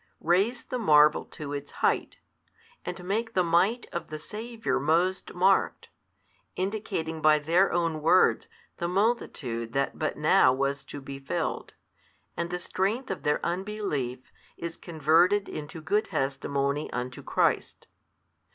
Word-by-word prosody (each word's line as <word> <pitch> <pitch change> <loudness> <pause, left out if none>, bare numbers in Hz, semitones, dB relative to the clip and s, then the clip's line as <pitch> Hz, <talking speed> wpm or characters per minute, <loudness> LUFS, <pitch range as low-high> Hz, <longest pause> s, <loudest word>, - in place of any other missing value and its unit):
raise 195 +9 +2
the 250 - -4
marvel 150 -7 +5
to 145 -2 -7
its 145 0 -6
height, - - 0 0.6
and 180 - -6
make 225 +5 -2
the 185 - +4
Might 180 +8 +2
of 170 -2 -4
the 155 - -6
Saviour 220 +7 -3
most 170 +6 0
marked, 190 +2 +2 0.7
indicating 185 -5 -3
by 155 0 +6
their 170 +6 +2
own 165 -3 0
words 175 +4 +4 0.3
the 170 - -2
multitude 165 - -1
that 140 0 -1
but 155 - -1
now 150 -3 +5
was 140 +2 -1
to 145 - -8
be 135 0 -8
filled, 135 -10 -3 0.6
and 170 0 -2
the 180 - -2
strength 195 +8 -2
of 180 -6 -4
their 150 +1 0
unbelief 175 - -3 0.3
is 170 -1 -5
converted 170 +5 +2
into 155 +2 -7
good 205 +7 0
testimony 140 -1 -1
unto 125 +1 -4
Christ. - - 0
165 Hz, 135 wpm, -27 LUFS, 145-195 Hz, 0.7 s, by